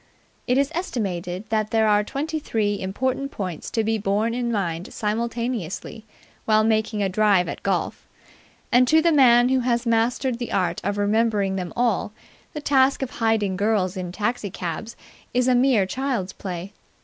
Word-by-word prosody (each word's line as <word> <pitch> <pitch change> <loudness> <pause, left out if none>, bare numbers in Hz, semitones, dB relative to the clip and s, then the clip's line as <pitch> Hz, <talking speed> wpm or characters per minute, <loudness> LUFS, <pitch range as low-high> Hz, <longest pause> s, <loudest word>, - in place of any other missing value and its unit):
It 250 0 +2
is 280 +2 +1
estimated 195 - -3
that 215 -1 0
there 220 -1 +2
are 210 0 +4
twenty 310 +8 -3
three 210 -7 -1
important 260 +8 -2
points 185 - -5
to 225 - 0
be 220 0 0
borne 210 +3 0
in 240 -1 -1
mind 175 -5 -2
simultaneously 225 -2 -3 0.4
while 215 0 +4
making 220 -1 +1
a - - +2
drive 195 -2 +3
at - - -6
golf; - - -2 0.6
and 250 +1 +5
to 315 +3 +5
the 340 - +4
man 245 -4 +6
who 260 0 +3
has 240 -1 0
mastered 235 +2 +1
the 240 - -4
art 185 -2 0
of 205 +1 -1
remembering 205 -1 +1
them 180 -3 -4
all 235 -3 0 0.4
the 300 - -5
task 270 -1 +3
of 260 - -5
hiding 220 -4 0
girls 200 -2 0
in 180 -2 -4
taxicabs 205 -1 -3 0.4
is 250 0 +2
mere 250 -4 +4
child's 240 -4 -2
play. 185 +1 -6
220 Hz, 160 wpm, -23 LUFS, 195-245 Hz, 0.6 s, man